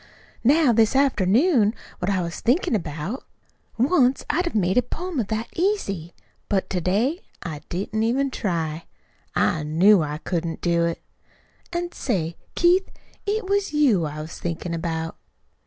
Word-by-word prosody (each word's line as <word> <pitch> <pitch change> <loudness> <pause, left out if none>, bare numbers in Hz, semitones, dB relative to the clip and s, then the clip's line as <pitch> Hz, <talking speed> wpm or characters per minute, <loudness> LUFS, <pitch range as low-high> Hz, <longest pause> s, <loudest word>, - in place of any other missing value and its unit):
"Now, 280 +1 +5
this 225 +2 +3
afternoon, 240 - +3 0.2
what 180 - -1
I 190 -3 +1
was 170 0 -5
thinkin' 255 +3 +2
about 170 - -3 0.5
once 260 0 +3
I'd've 345 -2 -1
made 190 +2 +3
a - - +4
poem 335 +5 -4
of 220 - -1
that 220 +1 -2
easy; 200 - -1 0.3
but 195 -2 0
to 180 -2 0
day 225 - +1 0.2
I 155 -4 -5
didn't 200 +4 -2
even 260 +5 +1
try. 165 -7 -2 0.5
I 155 - +2
KNEW 170 +6 +5
I 150 -1 -2
couldn't 165 0 -3
do 170 -1 +2
it. 170 0 -3 0.7
An', 345 0 -2
say, 170 - -2 0.2
Keith, 360 +2 +4 0.4
it 425 +1 0
was 400 -3 0
you 255 - +3
I 150 0 -5
was 155 +2 -8
thinkin' 170 0 -3
about." 165 -1 -3
210 Hz, 150 wpm, -24 LUFS, 170-275 Hz, 0.7 s, Now